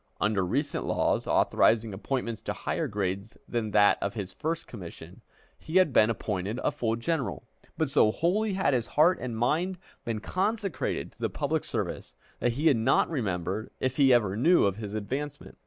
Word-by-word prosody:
Under 100 -2 +1
recent 140 - -1
laws, - - 0
authorizing 110 -2 +3
appointments 115 +2 -3
to - - -3
higher - - -2
grades 100 +1 -3
than 115 -3 -2
that 105 -1 +4
of 100 0 -2
his 100 -4 -5
first 160 - -3
commission, 90 -4 -10 0.4
he 160 - -8
had 185 -7 +5
been 110 0 +5
appointed 105 0 -2
a - - +2
full 115 -1 -1
general; 115 - -2 0.3
but 160 -1 +1
so 110 -5 +4
wholly 195 - 0
had 190 -6 +1
his 120 -3 0
heart 170 +5 +5
and 125 -2 -3
his 110 - -5
mind 170 +10 +1 0.3
been 115 -2 -2
consecrated 195 - -2
to - - -27
the - - -1
public - - -1
service, - - -4 0.2
that 120 - +1
he 145 +6 -3
had 145 -7 +5
not 130 +8 +2
remembered, 100 - -2
if 130 0 -1
he 135 -2 +5
ever 105 -6 +3
knew, 165 +11 +4
of 100 0 0
his 105 -1 -6
advancement. 140 - -5
115 Hz, 185 wpm, -28 LUFS, 105-150 Hz, 0.4 s, had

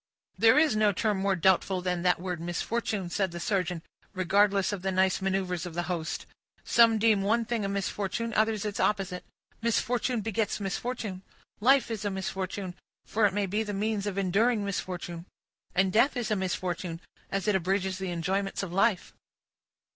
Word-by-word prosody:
"There 225 +3 +5
is 305 -6 +4
no 215 -1 +4
term 205 +1 0
more 195 0 +1
doubtful 190 +1 +2
than 180 -1 -1
that 180 -1 +2
word 180 -2 -4
misfortune," 190 +2 -2
said 195 0 0
the 175 0 -7
surgeon, 180 -3 -1 0.3
regardless 195 +2 +2
of 195 - -4
the 190 +1 -1
nice 190 0 +2
maneuvers 190 -2 -1
of 165 - -9
the 175 - -1
host. 170 -2 -3 0.4
"Some 230 -1 +5
deem 215 -2 +3
one 225 +4 +1
thing 235 -2 -1
a 195 - -1
misfortune, 200 +3 -2
others 215 -1 +1
its 205 -1 -3
opposite; 195 -3 0 0.4
misfortune 235 +1 0
begets 220 0 -1
misfortune. 200 0 -3 0.4
Life 260 +2 +4
is 220 -2 -3
a 205 - 0
misfortune, 190 -1 -4 0.3
for 215 -1 +3
it 195 - -4
may 205 -1 +1
be 205 +3 -1
the 205 -2 -3
means 210 0 -1
of 200 -1 -3
enduring 205 +3 +2
misfortune; 180 -3 -4 0.5
and 190 0 +2
death 250 +5 +4
is 235 -2 -2
a - - +3
misfortune, 180 -2 -3 0.3
as 195 +1 -2
it 210 - +4
abridges 190 +1 0
the 190 -1 -3
enjoyments 190 +4 -1
of 180 -3 -5
life." 195 0 +1
195 Hz, 175 wpm, -28 LUFS, 185-215 Hz, 0.5 s, There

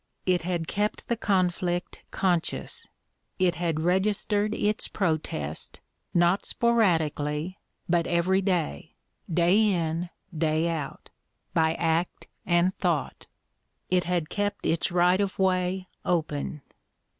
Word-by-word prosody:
It 180 -2 +2
had 170 -1 -2
kept 210 +1 -2
the 235 - +2
conflict 180 -4 0
conscious, 175 -3 -1 0.5
it 185 -2 +3
had 165 -3 -1
registered 205 +4 +1
its 210 +1 +1
protest, 155 - -2 0.3
not 175 +3 +3
sporadically 165 -7 +1 0.3
but 170 -1 +2
every 180 +3 +2
day, 175 - -1 0.4
day 175 +4 +4
in, 175 -4 +1 0.3
day 155 +1 +1
out, 155 -4 -5 0.4
by 160 0 +3
act 165 +1 0 0.2
and 175 +1 +3
thought; 165 -6 -1 0.6
it 180 -1 +3
had 175 -2 0
kept 205 0 -2
its 165 +2 +1
right 180 +2 +4
of 200 -1 -2
way 185 0 +1 0.2
open. 150 -3 -1
175 Hz, 110 wpm, -27 LUFS, 165-190 Hz, 0.6 s, day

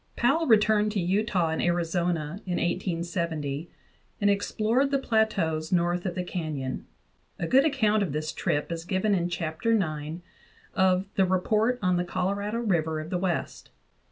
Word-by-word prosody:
Powell 280 +7 +2
returned 215 -2 +4
to 205 - 0
Utah 185 -1 +1
and 160 - -1
Arizona 170 0 -1
in 180 - -1
1870 170 -4 -2 0.5
and 205 0 +3
explored 220 +6 +1
the 275 - +2
plateaus 195 -11 0
north 175 0 +1
of 180 - -3
the 180 - -2
canyon. 155 -8 -4 0.5
A 170 - -2
good 265 - +4
account 220 -8 +2
of 190 -7 -1
this 155 +2 -2
trip 145 +3 -1
is 165 -1 -3
given 190 +3 0
in 175 -2 +1
Chapter 170 +6 -1
IX 155 -3 -2 0.5
of 190 0 +3
the 190 - +5
"Report 215 +6 +1
on 180 -1 +3
the 175 - +1
Colorado 200 +4 -2
River 165 -9 0
of 155 +2 -7
the 180 - 0
West." 180 -2 -3
180 Hz, 155 wpm, -27 LUFS, 165-210 Hz, 0.5 s, the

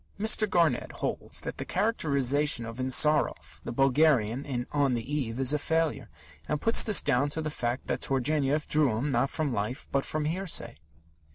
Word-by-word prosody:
Mr. 215 0 +3
Garnett 165 -9 +1
holds - - -4
that - - -6
the - - -2
characterization 145 - 0
of 115 +2 -8
Insarov, 130 +4 +1
the - - -5
Bulgarian, 135 -2 +2
in 125 -3 -3
On 140 -3 +1
the 120 +4 -4
Eve, 125 -5 -2
is 135 +1 +2
a 150 - +1
failure, 160 +2 -1 0.4
and 150 - -1
puts 225 +7 +3
this 205 -8 +4
down 140 0 +1
to 155 - -3
the 155 -1 -3
fact 120 -2 -3
that - - -3
Turgenev 140 +2 0
drew 145 -8 +2
him, 140 +5 -2
not 125 +2 +1
from 150 -4 -2
life, 110 +5 -4
but 140 0 +1
from 155 -1 -2
hearsay. 165 -7 -1
140 Hz, 180 wpm, -28 LUFS, 125-155 Hz, 0.4 s, this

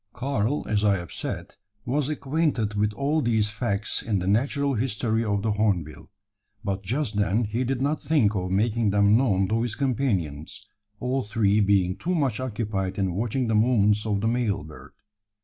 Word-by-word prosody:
Karl, 125 +1 -1
as 105 -1 +1
I 100 -2 +4
have 85 -3 -6
said, - - -6 0.3
was 140 +3 0
acquainted 145 -7 0
with 105 0 +1
all 145 +7 0
these 110 -4 +1
facts 110 -3 -2
in 110 -3 -1
the 90 - -2
natural 140 +7 +1
history 115 -1 0
of 100 -2 -1
the 110 - +1
hornbill; 100 -8 -1 0.5
but 100 -1 -2
just 110 +2 -2
then 105 +3 +2
he 110 +4 -1
did 130 +1 -1
not 150 +2 0
think 130 -10 +2
of 90 -3 -2
making 110 +3 +1
them 100 +1 +4
known 100 -7 +2
to 115 +1 +1
his 115 -2 -2
companions 100 - -2 0.3
all 130 +2 0
three 105 -2 +1
being 95 -3 +2
too 180 - -1
much 135 -8 0
occupied 105 -6 -3
in 95 -3 0
watching 120 +6 -1
the 110 - 0
movements 105 -2 +3
of 105 -2 -1
the 110 - +1
male 115 -4 0
bird. 75 0 -12
110 Hz, 180 wpm, -25 LUFS, 100-125 Hz, 0.5 s, I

